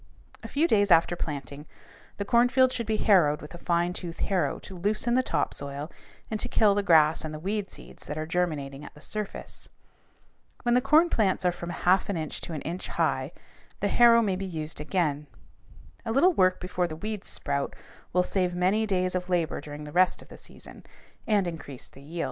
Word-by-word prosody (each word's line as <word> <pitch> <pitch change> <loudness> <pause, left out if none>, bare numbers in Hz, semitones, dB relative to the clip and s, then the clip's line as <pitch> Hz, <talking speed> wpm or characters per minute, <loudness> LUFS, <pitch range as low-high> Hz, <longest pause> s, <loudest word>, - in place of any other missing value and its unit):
A - - -7
few 310 +4 +1
days 205 -7 +3
after 170 0 +5
planting, 145 -2 -6 0.5
the 200 - -3
cornfield 250 +3 +4
should 235 -3 -3
be 220 -1 +1
harrowed 165 -10 +4
with 150 - -11
a 175 - -9
fine 175 0 0
tooth 170 -2 -6
harrow 190 -3 0
to 190 - -11
loosen 210 +6 0
the 255 - +4
top - - -1
soil 140 +2 -5 0.4
and 215 - -2
to - - -2
kill 210 -2 +4
the 205 - +1
grass 160 -5 +4
and 155 - -5
the - - -7
weed 200 +3 -2
seeds - - -11
that 150 - -4
are 155 - -2
germinating 150 -5 -2
at - - -11
the - - -14
surface. 210 +3 -6 0.9
When 240 -1 +2
the 250 - +4
corn 310 +6 +4
plants 190 -4 +1
are 180 - +4
from 170 0 -7
a - - -4
half 185 +2 +4
inch 160 -6 -3
to 170 - -6
an 150 - -5
inch 175 +3 -5
high, - - -1 0.5
the - - 0
harrow 235 -1 +6
may 200 -3 +1
again 185 - -3
be 195 - -3
used. 155 -3 -4
A 155 - -5
little 345 +10 +4
work 185 - +3
before 180 -1 -1
the 155 - -6
weeds 210 +4 -5
sprout 140 -1 -2 0.4
will 180 +1 +3
save 180 -1 -1
many 195 +5 +2
days 185 -2 0
of 180 0 -3
labor 170 -5 0
during 150 0 -8
the 150 - -8
rest 180 +3 +2
of - - -22
the - - -11
season, - - -13 0.4
and 210 -4 +3
increase 160 -6 -7
the 135 - -16
yield. 160 +5 -8
180 Hz, 205 wpm, -27 LUFS, 155-210 Hz, 0.9 s, harrow